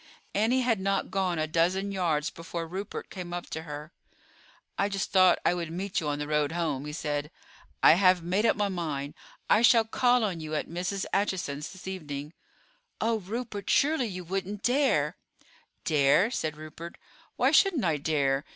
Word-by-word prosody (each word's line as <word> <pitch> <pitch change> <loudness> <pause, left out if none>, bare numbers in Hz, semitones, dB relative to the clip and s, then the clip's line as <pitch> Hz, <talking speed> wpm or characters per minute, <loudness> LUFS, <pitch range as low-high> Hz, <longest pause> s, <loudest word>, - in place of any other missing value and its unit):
Annie 230 +5 +2
had 235 -4 +1
not 195 +1 -1
gone 185 -3 0
a 155 - +1
dozen 180 +5 +1
yards 165 -6 0
before 165 0 -6
Rupert 190 +4 -6
came 180 -2 -6
up 175 0 -6
to 160 - -3
her. 150 0 -8 0.8
"I 200 - +1
just 195 -1 -3
thought 185 -2 +6
I - - +4
would 170 -2 -3
meet 185 +3 -2
you 155 - -4
on 145 0 -1
the 145 0 -4
road 150 0 +1
home," 155 -5 -2
he 150 - -5
said. 150 -1 -3 0.5
"I - - +9
have 185 -1 +4
made 185 +5 +1
up 230 - +4
my 205 -1 +1
mind; 155 -7 -3 0.3
I 215 - +4
shall 230 -1 +6
call 245 +2 +2
on 190 -6 -1
you 155 -1 -4
at 150 - -2
Mrs. 180 +3 -3
Acheson's 180 -7 -1
this 190 -1 -11
evening." 150 -5 -6 0.7
"Oh, 225 0 +1
Rupert, 210 0 -5
surely 285 -4 +3
you 185 -3 -6
wouldn't 195 +3 -4
dare?" 270 +3 +2 0.7
"Dare?" 150 - +4
said 155 - -2
Rupert; 155 +2 -9 0.4
"why - - +3
shouldn't 340 - +4
I 160 -3 +2
dare? 140 -2 +1
180 Hz, 180 wpm, -28 LUFS, 155-200 Hz, 0.8 s, I